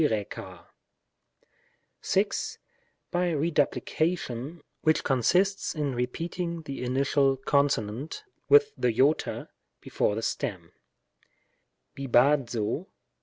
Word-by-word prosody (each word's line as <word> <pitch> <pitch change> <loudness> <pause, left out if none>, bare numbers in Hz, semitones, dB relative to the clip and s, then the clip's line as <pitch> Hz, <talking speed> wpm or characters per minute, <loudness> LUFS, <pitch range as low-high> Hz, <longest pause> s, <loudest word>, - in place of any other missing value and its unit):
By 110 -9 +1 2.9
Keduplication, 160 -3 0 0.2
which 155 0 +2
consists 180 - +2
in 145 -3 -1
repeating 165 +7 -3
the 140 -3 -6
initial 135 +2 +2
consonant 140 - 0 0.3
with 435 0 +6
the - - 0
Iota, 130 +6 +1 0.3
before 105 - -1
the 110 - -3
stem: 90 -6 -3 1.2
fic/3d^(o 130 - +2
140 Hz, 75 wpm, -27 LUFS, 125-165 Hz, 2.9 s, with